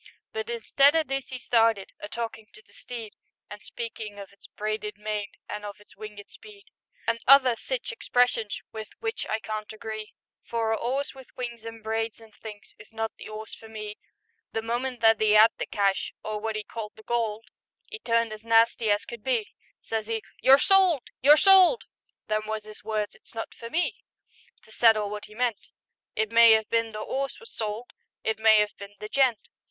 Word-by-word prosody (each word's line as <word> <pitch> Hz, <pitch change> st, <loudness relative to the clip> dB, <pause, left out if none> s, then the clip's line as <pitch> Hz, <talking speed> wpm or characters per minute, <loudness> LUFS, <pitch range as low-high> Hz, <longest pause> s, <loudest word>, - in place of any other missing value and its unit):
But 220 Hz, 0 st, -4 dB
instead 275 Hz, +5 st, +3 dB
o' 320 Hz, -, +4 dB
this 270 Hz, -2 st, -4 dB
'e 255 Hz, -, -4 dB
started 225 Hz, -5 st, +2 dB
A 205 Hz, -, -7 dB
talkin' 225 Hz, -2 st, -5 dB
to 215 Hz, -, -16 dB
the -, -, -24 dB
steed, 230 Hz, -4 st, -8 dB, 0.4 s
And 210 Hz, 0 st, -8 dB
speakin' 220 Hz, -3 st, -7 dB
of 200 Hz, -1 st, -10 dB
its 200 Hz, -, -16 dB
"braided 215 Hz, -1 st, -4 dB
mane" 210 Hz, -1 st, -4 dB
An' 210 Hz, 0 st, -5 dB
of 205 Hz, -1 st, -7 dB
its 210 Hz, -, -20 dB
"winged 210 Hz, -1 st, -9 dB
speed," 420 Hz, -1 st, -15 dB, 0.4 s
And 230 Hz, 0 st, 0 dB
other 260 Hz, -2 st, +8 dB
sich -, -, -4 dB
expressions 245 Hz, -, +1 dB
With 220 Hz, -1 st, -6 dB
which 450 Hz, 0 st, -3 dB
I 220 Hz, -, 0 dB
can't 215 Hz, -1 st, -5 dB
agree, 215 Hz, 0 st, -7 dB, 0.3 s
For 225 Hz, -1 st, -1 dB
a -, -, +3 dB
'orse 265 Hz, +5 st, -2 dB
with 265 Hz, -1 st, -13 dB
wings 235 Hz, -2 st, -5 dB
an' 225 Hz, -1 st, -9 dB
braids 225 Hz, +1 st, -2 dB
an' 225 Hz, -1 st, -16 dB
things 210 Hz, -1 st, -11 dB
Is 215 Hz, -, -15 dB
not 225 Hz, 0 st, -3 dB
the -, -, -9 dB
'orse 215 Hz, 0 st, -7 dB
for 225 Hz, -, -11 dB
me. 215 Hz, -1 st, -7 dB, 0.5 s
The 225 Hz, -, -2 dB
moment 240 Hz, +1 st, -2 dB
that 225 Hz, -1 st, +5 dB
'e 215 Hz, -1 st, +5 dB
'ad 220 Hz, +2 st, +8 dB
the -, -, -2 dB
cash 200 Hz, -1 st, 0 dB
— -, -, -66 dB
Or 215 Hz, -1 st, -3 dB
wot 220 Hz, 0 st, -2 dB
'e 215 Hz, -, -4 dB
called 215 Hz, 0 st, -7 dB
the 220 Hz, -, -15 dB
gold, 225 Hz, -2 st, -2 dB, 0.4 s
'E 435 Hz, -, -6 dB
turned 230 Hz, -, +1 dB
as 215 Hz, 0 st, -10 dB
nasty 230 Hz, 0 st, +4 dB
as 205 Hz, 0 st, +2 dB
could 235 Hz, -3 st, -9 dB
be: 240 Hz, -5 st, -1 dB, 0.3 s
Says 220 Hz, -1 st, -3 dB
'e, 225 Hz, -1 st, -2 dB, 0.2 s
"You're 265 Hz, +1 st, +8 dB
sold! 370 Hz, -4 st, +4 dB, 0.2 s
You're 290 Hz, +4 st, +8 dB
sold!" 385 Hz, +6 st, +6 dB, 0.4 s
Them 215 Hz, 0 st, -1 dB
was 215 Hz, -1 st, -3 dB
'is 215 Hz, -1 st, -11 dB
words; 215 Hz, -1 st, -2 dB
it's -, -, -16 dB
not 225 Hz, -, -5 dB
for 230 Hz, -, -9 dB
me 345 Hz, +7 st, 0 dB, 0.7 s
To 220 Hz, -, -19 dB
settle 215 Hz, -3 st, +4 dB
wot 210 Hz, 0 st, -5 dB
he 215 Hz, -, -15 dB
meant; 235 Hz, -3 st, -1 dB, 0.5 s
It 215 Hz, 0 st, 0 dB
may 230 Hz, -1 st, +8 dB
'ave 220 Hz, -, -5 dB
been 230 Hz, -1 st, +1 dB
the 215 Hz, 0 st, -6 dB
'orse 270 Hz, +4 st, -3 dB
was 460 Hz, -, -11 dB
sold, 220 Hz, +2 st, -4 dB, 0.3 s
It 220 Hz, -1 st, -1 dB
may 220 Hz, -1 st, +6 dB
'ave 210 Hz, -, -6 dB
been 200 Hz, 0 st, -10 dB
the 210 Hz, -, -6 dB
gent. 255 Hz, -2 st, +2 dB
225 Hz, 200 wpm, -27 LUFS, 215-240 Hz, 0.7 s, other